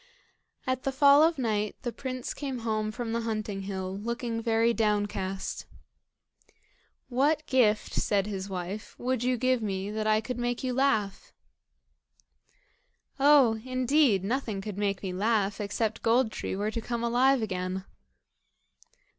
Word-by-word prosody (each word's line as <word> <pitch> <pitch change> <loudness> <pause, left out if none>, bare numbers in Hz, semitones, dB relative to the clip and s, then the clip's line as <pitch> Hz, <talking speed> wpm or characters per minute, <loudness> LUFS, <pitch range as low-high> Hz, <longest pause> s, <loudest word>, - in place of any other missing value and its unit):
At 255 0 -1
the 270 - -1
fall 280 +2 +6
of 325 0 +4
night 215 -4 -1
the 240 - -2
prince 255 0 -5
came 270 -4 -5
home 215 -1 -1
from 230 0 -4
the 235 - 0
hunting 215 -3 -3
hill, 190 -1 -4
looking 230 +2 -3
very 230 +1 +2
downcast. 205 -3 -1 1.4
"What 290 +5 +1
gift," 225 -6 +2
said 200 -2 +1
his 195 -2 -5
wife, 190 +3 -5
"would 255 -1 -1
you 250 0 +1
give 255 0 +1
me 195 -1 -3
that 215 0 -2
I 215 0 +4
could 245 +2 -5
make 245 +1 -2
you 255 -1 -1
laugh?" 220 -7 0 1.9
"Oh! 270 -6 +5
indeed, 255 - +2
nothing 225 -1 -2
could 200 0 -6
make 200 -1 -1
me 185 -2 -3
laugh, 205 0 0
except 210 +2 -2
Gold 230 0 +3
tree - - -4
were 205 +2 -1
to 230 - -3
come 235 +1 -3
alive 250 +2 +3
again." 185 -1 -3
225 Hz, 145 wpm, -28 LUFS, 205-255 Hz, 1.9 s, fall